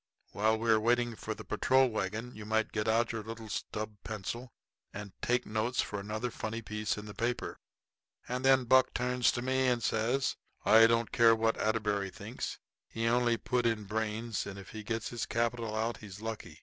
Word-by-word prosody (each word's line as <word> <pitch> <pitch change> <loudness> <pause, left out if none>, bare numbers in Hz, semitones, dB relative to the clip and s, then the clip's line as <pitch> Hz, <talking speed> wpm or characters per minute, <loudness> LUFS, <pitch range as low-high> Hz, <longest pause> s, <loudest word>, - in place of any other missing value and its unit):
While 110 +2 +2
we 115 0 +1
are 110 - +5
waiting 120 +1 +2
for 110 0 -5
the - - -9
patrol 130 +5 +3
wagon 110 +3 -3
you 110 - -9
might 110 +1 0
get 105 0 -1
out 115 +1 +3
your 115 -1 -3
little 110 0 -8
stub 105 0 -4
pencil 115 +3 -5 0.4
and 100 -1 -7
take 125 +1 +1
notes 110 +3 -1
for 105 - 0
another 110 +4 -3
funny 115 +1 -4
piece 105 -1 -2
in 105 - -6
the 105 - -8
paper." 120 +2 -2 0.7
And 125 +1 -2
then 135 -1 +5
Buck 130 +1 +4
turns 125 -2 +2
to 120 - -2
me 130 0 +2
and 120 -2 +1
says: 120 +5 +1 0.3
"I 115 +1 +8
don't 115 0 +1
care 115 -1 +6
what 115 0 +2
Atterbury 105 -3 0
thinks. 90 - -6 0.3
He 115 0 -3
only 120 0 +3
put 125 0 0
in 110 -2 0
brains, 110 +2 -2
and 100 -1 -7
if 95 -2 -10
he 110 - -7
gets 110 +1 -3
his 120 -2 -3
capital 115 -1 -1
out 115 +2 -1
he's 100 -2 -10
lucky. 110 0 -6
115 Hz, 195 wpm, -32 LUFS, 110-120 Hz, 0.7 s, I